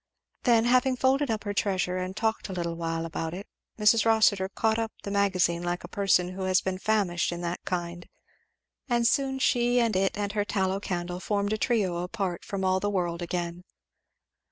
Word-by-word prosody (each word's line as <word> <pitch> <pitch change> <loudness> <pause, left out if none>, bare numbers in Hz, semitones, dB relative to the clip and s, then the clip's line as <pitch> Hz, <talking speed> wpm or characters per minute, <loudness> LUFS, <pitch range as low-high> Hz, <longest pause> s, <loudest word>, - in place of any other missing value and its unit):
Then, 235 -2 +4
having 255 +1 +3
folded 265 +2 +2
up 220 -1 -1
her 205 -1 -3
treasure 185 -3 0
and 185 +2 -4
talked 220 -1 -1
a - - -4
little 170 -2 -2
while 165 0 -3
about 165 0 -4
it, 195 +3 -7 0.3
Mrs. 215 +1 +4
Rossitur 215 -4 +3
caught 220 +2 0
up 225 -1 -2
the 200 - -5
Magazine 185 -4 +2
like 175 0 -3
a - - -7
person 190 -3 +2
who 185 +1 -7
had 185 0 +3
been 185 -1 -2
famished 195 -6 +1
in 175 0 -5
that 175 0 -4
kind; 175 -1 -4 0.8
and 240 -1 +2
soon 270 0 +1
she 245 -2 +2
and 230 -4 +1
it 195 +2 +1
and 205 -1 -2
her 205 0 0
tallow 190 -2 -1
candle 175 -2 -4
formed 205 +1 -1
a - - 0
trio 205 -8 +1
apart 180 0 -3
from 195 -1 -3
all 185 0 +2
the 205 - -1
world 175 -3 -1
again. 175 0 -3
195 Hz, 195 wpm, -27 LUFS, 175-220 Hz, 0.8 s, Then